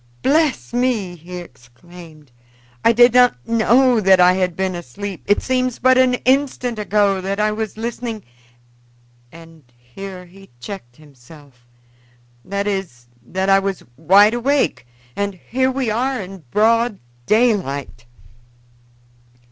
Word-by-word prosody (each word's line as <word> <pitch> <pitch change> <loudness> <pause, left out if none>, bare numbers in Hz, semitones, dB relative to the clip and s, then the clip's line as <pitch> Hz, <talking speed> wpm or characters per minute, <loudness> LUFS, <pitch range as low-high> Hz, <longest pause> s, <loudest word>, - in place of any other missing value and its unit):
"Bless 295 -3 +1
me!" 240 -7 -1
he 175 +2 -10
exclaimed, 155 +1 -14 0.5
"I 230 - +5
did 240 +1 +5
not 245 - +3
know 235 +2 +3
that 190 -2 +4
I 180 0 +6
had 185 -2 -1
been 190 0 -2
asleep. 180 +4 -7
It 205 - +2
seems 255 -1 -1
but 260 +1 +4
an 255 -1 +3
instant 255 -3 0
ago 205 -2 +1
that 195 +2 -3
I 215 0 +1
was 215 0 -5
listening" 230 -1 -5 1.1
and 165 -2 -15
here 180 +10 -10
he 195 +2 -17
checked 125 -6 -9
himself 140 -3 -18 0.8
"that 200 +5 -3
is, 190 -13 -4 0.2
that 190 +10 -3
I 195 0 +5
was 195 -1 -4
wide 195 - +5
awake, 260 - 0 0.3
and 200 -1 -3
here 260 +8 -1
we 260 -4 -2
are 255 +4 -1
in 190 -4 -9
broad 230 - +2 0.3
daylight." 180 - 0
200 Hz, 130 wpm, -19 LUFS, 175-235 Hz, 1.1 s, I